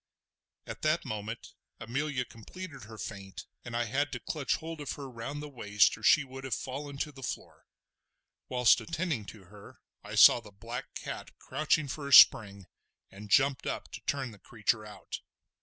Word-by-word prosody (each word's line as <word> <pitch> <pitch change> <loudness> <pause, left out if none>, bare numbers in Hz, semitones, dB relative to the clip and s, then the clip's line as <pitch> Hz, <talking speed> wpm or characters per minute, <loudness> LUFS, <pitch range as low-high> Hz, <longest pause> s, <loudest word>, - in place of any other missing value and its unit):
At - - -8
this 155 +2 +1
moment 110 +2 -5 0.3
Amelia 135 +3 -2
completed 140 - -10
her 110 +1 -11
faint, 100 -3 -7 0.2
and 120 -1 -6
I 120 - +1
had 140 +6 -1
to - - -3
clutch 150 -4 -1
hold 160 -1 -7
of 145 - -3
her 140 -1 -7
round 130 +4 -6
the - - -6
waist 105 -7 +2
or - - -15
she 145 +7 +5
would 135 0 -10
have 135 - -1
fallen 140 +1 -6
to 150 +2 -2
the 135 -2 -13
floor. 125 - -6 0.8
Whilst 125 -2 +5
attending 165 - -2
to 100 +1 -11
her 100 +2 -15 0.2
I - - -7
saw - - +9
the 110 -3 -13
black 115 +6 -7
cat - - -7
crouching 155 0 0
for 140 +1 -5
a 140 - -1
spring, 100 -6 +8 0.5
and 105 +2 -11
jumped 135 +2 +3
up - - -4
to - - -8
turn 135 -4 -1
the 105 - -15
creature 110 0 -1
out. 105 - -8
125 Hz, 180 wpm, -30 LUFS, 110-145 Hz, 0.8 s, saw